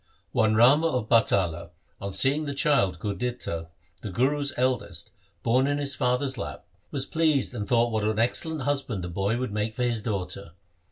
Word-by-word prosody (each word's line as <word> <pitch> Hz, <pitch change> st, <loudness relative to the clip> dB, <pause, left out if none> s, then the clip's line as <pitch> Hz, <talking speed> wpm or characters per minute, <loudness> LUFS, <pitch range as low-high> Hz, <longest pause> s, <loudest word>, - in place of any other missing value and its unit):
One 110 Hz, -1 st, +2 dB
Rama 135 Hz, +8 st, +6 dB
of 125 Hz, -8 st, -1 dB
Batala 90 Hz, -8 st, +2 dB, 0.3 s
on 100 Hz, 0 st, -4 dB
seeing 140 Hz, +9 st, +2 dB
the 140 Hz, -1 st, -4 dB
child 135 Hz, -, +2 dB
Gurditta 100 Hz, -4 st, -4 dB, 0.3 s
the 105 Hz, -, -5 dB
Guru's 140 Hz, +8 st, +1 dB
eldest 130 Hz, 0 st, -1 dB, 0.3 s
born 125 Hz, +4 st, +3 dB
in 145 Hz, 0 st, 0 dB
his 140 Hz, -2 st, 0 dB
father's 125 Hz, +2 st, 0 dB
lap, -, -, -6 dB, 0.2 s
was 135 Hz, -2 st, -1 dB
pleased 155 Hz, -5 st, +1 dB
and 105 Hz, -4 st, -4 dB
thought 120 Hz, -1 st, +2 dB
what 110 Hz, -1 st, -1 dB
an 110 Hz, 0 st, 0 dB
excellent 145 Hz, +6 st, 0 dB
husband 135 Hz, -8 st, -1 dB
the 90 Hz, -, -4 dB
boy 100 Hz, +6 st, -1 dB
would 125 Hz, -3 st, -3 dB
make 105 Hz, +1 st, -2 dB
for 125 Hz, -, -1 dB
his 120 Hz, -3 st, 0 dB
daughter. 100 Hz, -4 st, -4 dB
120 Hz, 175 wpm, -26 LUFS, 105-140 Hz, 0.3 s, Rama